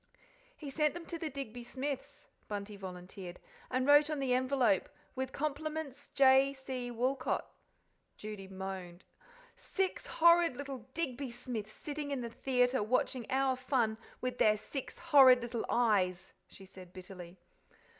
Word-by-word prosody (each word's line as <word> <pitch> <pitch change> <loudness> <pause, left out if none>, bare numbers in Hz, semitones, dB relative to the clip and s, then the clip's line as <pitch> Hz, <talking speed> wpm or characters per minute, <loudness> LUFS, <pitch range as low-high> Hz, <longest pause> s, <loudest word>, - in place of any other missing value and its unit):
"He 290 -3 -7
sent 300 +2 +1
them 345 -1 -7
to 335 - -6
the 320 - -3
Digby 245 -4 -6
Smiths," 265 +2 -5 0.2
Bunty 205 0 -5
volunteered, 180 -1 -8 0.3
"and 255 0 0
wrote 290 +1 +6
on 305 - -1
the 270 -2 +1
envelope, 260 +2 +2 0.2
'With 260 -1 -3
compts. 305 -1 -4
J. 270 0 +6
C. 260 -2 -5
Woolcot.'" 255 +2 -1 0.7
Judy 210 -2 -7
moaned. 190 -2 -7 0.5
"Six 385 -1 -2
horrid 335 -4 +5
little 270 -4 -6
Digby 275 -5 -2
Smiths 235 -3 -6
sitting 295 -1 -5
in 275 -3 -2
the 235 -1 -5
theatre 250 0 +1
watching 240 +2 0
our 265 -1 +2
fun 250 -4 0 0.2
with 250 0 -3
their 215 0 +5
six 270 +5 -6
horrid 270 -7 +7
little 235 -1 -3
eyes," 200 -7 +2
she 195 - -13
said 185 -1 -13
bitterly. 180 -1 -10
255 Hz, 140 wpm, -33 LUFS, 215-280 Hz, 0.7 s, horrid